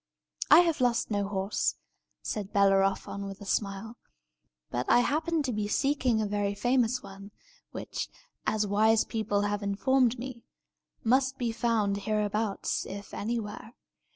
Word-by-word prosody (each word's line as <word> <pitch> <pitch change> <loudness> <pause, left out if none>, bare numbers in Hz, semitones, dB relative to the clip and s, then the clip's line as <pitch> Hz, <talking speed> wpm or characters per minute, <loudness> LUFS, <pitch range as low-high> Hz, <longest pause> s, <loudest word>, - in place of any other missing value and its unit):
"I - - +9
have 330 -5 0
lost 245 -1 +1
no 205 -1 0
horse," 195 0 -1 0.5
said 205 -2 -4
Bellerophon, 195 0 +2
with 195 -1 -8
a 205 - -9
smile. 200 +3 -2 0.7
"But 120 +1 -2
I 245 - +6
happen 315 +4 0
to 255 -3 -2
be 210 -1 -1
seeking 260 0 +1
a 215 - +1
very 205 0 -1
famous 250 +2 +1
one, 195 0 -10 0.4
which, - - -5 0.4
as 215 -1 +1
wise 215 +2 +3
people 215 -3 -1
have 205 0 -1
informed 245 +5 +2
me, 245 0 -7 0.6
must 260 +3 +2
be 240 -2 -1
found 225 -3 +1
hereabouts, 210 0 -1
if 200 +1 -8
anywhere. 220 +1 -4
215 Hz, 140 wpm, -29 LUFS, 200-245 Hz, 0.7 s, I